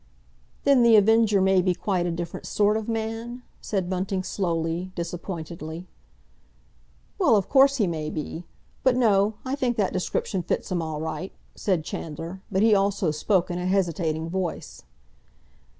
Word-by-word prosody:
'" - - -35
"Then 275 -3 +5
The 235 -1 +6
Avenger 215 -1 +5
may 190 -1 +4
be 180 0 +1
quite 180 -3 -1
a - - -1
different 170 0 -5
sort 210 0 +2
of 220 0 -3
man?" 225 +2 -4 0.2
said 190 -4 -2
Bunting 185 +1 -2
slowly, 170 -1 -2
disappointedly. 170 -1 -6 1.3
"Well, 280 - +5
of 200 -3 +1
course 275 0 +5
he 225 -7 +2
may 155 -3 -3
be. 155 +2 -5 0.4
But, 260 -2 +3
no; 210 -4 +3
I 260 - -2
think 255 -4 0
that 200 -3 +1
description 185 +1 -1
fits 175 - -3
him 175 -2 0
all 160 -2 -4
right," 160 +4 -4 0.2
said 185 -6 0
Chandler; 165 +6 -6
but 190 +1 +2
he 220 -1 +5
also 195 -4 +2
spoke 175 +4 +1
in 175 - -3
a 180 - -2
hesitating 165 -4 0
voice. 165 - -4
185 Hz, 160 wpm, -25 LUFS, 170-215 Hz, 1.3 s, The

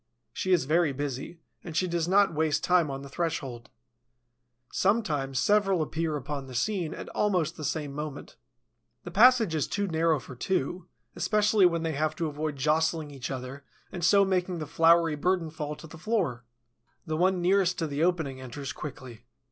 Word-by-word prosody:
She 185 - -2
is 175 -7 +3
very 155 0 +2
busy, 145 +4 -5 0.2
and 165 -2 -5
she 185 - +2
does 170 -1 -1
not 195 0 +4
waste 155 -1 0
time 180 -4 +3
on 135 0 -5
the - - -8
threshold. 135 -6 -4 1.0
Sometimes 150 - 0
several 195 -3 +3
appear 155 0 -2
upon 140 0 -5
the 130 - -9
scene 170 - -1
at - - -8
almost 185 -7 0
the 155 - -8
same 150 -1 -2
moment. 150 -1 -6 0.7
The 175 - -7
passage 225 -2 +5
is 155 -3 0
too 205 0 -1
narrow 165 -3 +1
for 130 +1 -11
two, 175 +5 -2 0.3
especially 210 -2 +3
when 170 -1 -1
they 165 - -1
have 155 +2 -1
to 165 - -2
avoid 150 0 -3
jostling 155 +2 0
each 135 -3 -6
other 130 +1 -6 0.3
and 180 -2 -6
so 200 +3 +5
making 185 -1 0
the 155 - -4
floury 165 +1 +4
burden 170 +1 0
fall 150 -1 -5
to 160 - -12
the 160 0 -12
floor. 165 - -1 0.6
The 155 -2 -2
one 185 +3 +2
nearest 180 0 +2
to 165 - -1
the 145 +1 -1
opening 160 -7 0
enters 130 +2 -6
quickly. 125 -5 -9
160 Hz, 180 wpm, -28 LUFS, 145-180 Hz, 1.0 s, passage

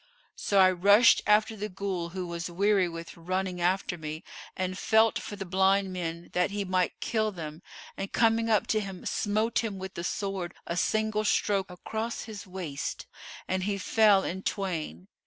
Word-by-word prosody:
So 200 - 0
I 185 -1 +7
rushed 205 +5 +6
after 215 +1 +4
the 210 0 -4
Ghul, 185 -3 -4
who 185 -1 -3
was 170 0 -4
weary 195 +1 +2
with 165 0 -8
running 185 +1 -3
after 180 0 0
me 155 +1 -6 0.3
and 185 0 -2
felt 220 +3 +3
for 205 - -7
the 195 -1 -6
blind 190 +1 +2
men 170 -1 -5
that 180 +1 +2
he 200 0 -3
might 185 -1 0
kill 215 -2 0
them 160 -3 -7 0.3
and, 195 - -5
coming 230 0 +2
up 215 -3 +3
to 215 - +2
him 195 -3 -7
smote 215 +3 0
him 210 -4 -3
with 190 0 -7
the 170 - -5
sword 190 -1 -3
a 170 - -3
single 215 +3 +1
stroke 200 -2 +1
across 220 +6 -4
his 210 -4 -8
waist 180 -7 -5 0.4
and 185 0 -1
he 200 -1 -1
fell 205 -1 +4
in 190 +2 -3
twain. 160 - -3
190 Hz, 175 wpm, -28 LUFS, 175-210 Hz, 0.4 s, I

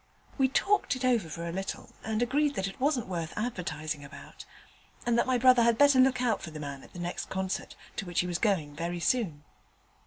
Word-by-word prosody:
We 265 - +5
talked 395 +2 +2
it 255 0 -3
over 235 -9 +2
for 170 +1 -5
a - - -3
little 195 +2 -5
and 220 +1 0
agreed 285 +4 +1
that 190 - -1
it 195 - -8
wasn't 265 -3 +1
worth 170 -3 -4
advertising 155 -9 -3
about, 140 - -11 0.6
and 240 - +2
that 235 - +2
my 255 -1 +3
brother 250 0 +6
had 230 -1 +4
better 285 -2 +6
look 255 -1 +4
out 225 -4 +1
for - - -6
the 155 -1 -8
man 140 -2 -6
at - - -16
the - - -10
next 175 0 -4
concert, 190 0 -3 0.2
to 195 - -3
which 175 - +1
he - - -3
was 175 -1 -2
going 165 -10 +1
very 170 +2 -3
soon. 170 -7 0
195 Hz, 220 wpm, -29 LUFS, 170-250 Hz, 0.6 s, brother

